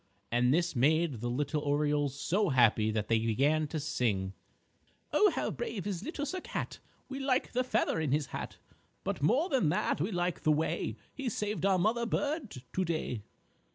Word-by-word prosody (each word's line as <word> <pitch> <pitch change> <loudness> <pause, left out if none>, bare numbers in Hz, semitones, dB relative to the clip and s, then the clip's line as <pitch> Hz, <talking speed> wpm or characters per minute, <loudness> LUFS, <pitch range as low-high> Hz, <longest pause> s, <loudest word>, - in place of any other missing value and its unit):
And 120 +1 +3
this 170 +2 +1
made 145 -1 +2
the 120 - -1
little 145 +4 -1
Orioles 145 -1 +1
so 195 +5 +1
happy 115 -5 +4
that 105 -1 -1
they 115 -1 +3
began 140 +8 +2
to 155 +2 -3
sing: 100 -10 -1 0.8
"_Oh, 420 - +5
how - - -1
brave 225 - -4
is 195 -4 -2
Little 295 0 -3
Sir 365 +6 -3
Cat! - - -4 0.3
We 270 0 -5
like 270 -1 +1
the 250 +1 +1
feather 220 -8 +1
in 155 -4 0
his 145 +1 +2
hat, - - -5 0.5
But - - -2
more 250 - +3
than 260 - +2
that 145 - 0
we 185 +7 0
like 175 -2 -1
the 155 - +3
way 155 +2 0 0.2
He 270 -3 -3
saved 205 -3 -1
our 190 -1 +4
Mother 225 +6 +1
Bird 280 - -2
to 185 - +1
day! 155 - -2
160 Hz, 185 wpm, -31 LUFS, 135-215 Hz, 0.8 s, Oh